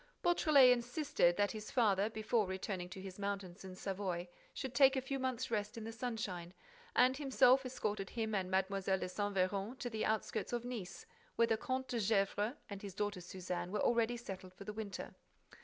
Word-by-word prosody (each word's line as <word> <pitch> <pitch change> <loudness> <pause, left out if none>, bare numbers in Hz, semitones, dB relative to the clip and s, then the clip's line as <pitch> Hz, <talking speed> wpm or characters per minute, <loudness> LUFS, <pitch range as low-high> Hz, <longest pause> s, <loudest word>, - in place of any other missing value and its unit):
— - - -41
Beautrelet 300 -7 +6
insisted 245 - +2
that 205 0 +2
his 215 -1 -6
father, 210 -4 +3
before 220 -1 0
returning 190 -1 -3
to 185 - -8
his 190 0 -8
mountains 200 -2 -4
in 185 -1 -8
Savoy, 185 -2 -3 0.2
should 265 -3 -5
take 270 -1 +6
a - - +2
few 270 +1 -2
months' 255 -3 -2
rest 210 +1 -1
in 225 - -5
the 225 - -5
sunshine, 220 -7 -4 0.4
and 255 +1 +5
himself 265 -2 +4
escorted 210 -6 -2
him 220 -2 -2
and 190 -2 0
Mlle. 190 +1 +1
de 190 -1 0
Saint 205 +2 -2
Véran 195 +6 0
to 245 -1 -4
the 220 -1 -2
outskirts 220 +2 -1
of 240 0 -1
Nice, 215 -7 -6 0.3
where 230 - +5
the 225 - +2
Comte 260 +4 -2
de 240 - -1
Gesvres 205 +2 +1
and 200 -1 -7
his 200 -3 -7
daughter 205 -2 -2
Suzanne 180 0 -4
were 210 - -1
already 235 0 +2
settled 190 -5 -8
for 200 - -9
the 210 - -5
winter. 210 -3 -5
210 Hz, 195 wpm, -36 LUFS, 190-240 Hz, 0.4 s, Beautrelet